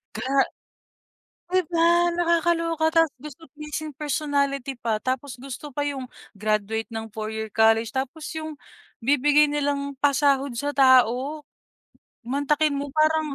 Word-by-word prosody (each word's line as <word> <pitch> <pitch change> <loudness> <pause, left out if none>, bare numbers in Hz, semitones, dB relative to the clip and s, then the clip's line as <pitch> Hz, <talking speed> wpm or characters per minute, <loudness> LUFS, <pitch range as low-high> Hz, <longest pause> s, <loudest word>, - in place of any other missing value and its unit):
gra 260 - -4 1.2
'di 370 - +4
ba? 345 +1 +3
Nakakaloka 335 -1 +1
tapos 325 -2 +3 0.2
gusto 325 +4 -15
pleasing 300 0 -6
personality 280 -2 -1
pa, 230 -3 -2
tapos 255 +2 -3
gusto 275 +3 -8
pa 290 +2 -2
'yong 265 -3 -4 0.2
graduate 215 +2 -1
ng 225 0 -5
4 215 0 -4
year 220 0 -4
college. 225 +2 +3
Tapos 275 +4 -4
'yong 310 -2 -6 0.4
bibigay 290 +4 +4
nilang 285 -1 -1
pasahod 280 -1 +2
sa 290 +2 -2
tao, 260 +3 +3 0.8
mantakin 285 +3 +1
mo 285 - -3
parang, 310 -1 +2
285 Hz, 125 wpm, -24 LUFS, 255-310 Hz, 1.2 s, di